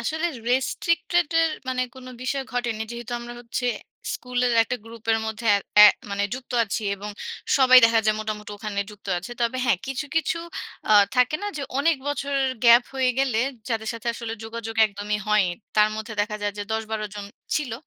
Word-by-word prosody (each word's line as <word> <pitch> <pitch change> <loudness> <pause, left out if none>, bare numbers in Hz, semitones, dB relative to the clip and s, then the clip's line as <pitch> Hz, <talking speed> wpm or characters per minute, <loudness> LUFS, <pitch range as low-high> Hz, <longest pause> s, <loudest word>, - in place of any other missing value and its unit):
আসলে 315 +2 -1 0.2
রেস্ট্রিকটেডের 330 +4 +1 0.2
মানে 255 -1 0
কোনো 255 -1 -10
বিষয় 270 +1 -1
ঘটেনি। 240 -3 -1
যেহেতু 240 +1 -7
আমরা 240 0 -8
হচ্ছে 245 +1 -3 0.5
স্কুলের 250 -1 -1
একটা 250 +3 -3
গ্রুপের 225 0 -1
মধ্যে 220 +1 -4
এ - - +1 0.3
এ - - +12 0.2
মানে 200 0 -1
যুক্ত 255 -1 -9
আছি 215 +1 -3
এবং 205 +2 -7 0.5
সবাই 255 -1 +8
দেখা 230 0 +5
যায় 215 0 +3
মোটামুটি 210 -1 -5
ওখানে 205 -1 -3
যুক্ত 205 -1 -15
আছে। 190 +7 -9
তবে 235 +2 0
হ্যাঁ, 240 -8 +3
কিছু, 270 +2 -3
কিছু 330 +1 +1 0.5
আ - - +7 0.2
থাকে 250 +4 +3
না - - -2
যে 285 - -3 0.2
অনেক 320 +2 +3
বছরের 275 -1 0
গ্যাপ 235 +1 +8
হয়ে 260 -1 +2
গেলে 255 -5 +2 0.3
যাদের 220 -2 -2
সাথে 230 +1 -9
আসলে 230 -1 -5
যোগাযোগ 225 0 -6
একদমই 210 0 -3
হয়ই। 210 -3 +4 0.3
তার 210 0 +6
মধ্যে 220 +1 -6
দেখা 210 +1 -1
যায় 205 0 0
যে - - -2
১০-১২ 220 -1 -2
জন 205 -1 -6 0.3
ছিল। 280 -6 -2
235 Hz, 180 wpm, -24 LUFS, 215-260 Hz, 0.5 s, এ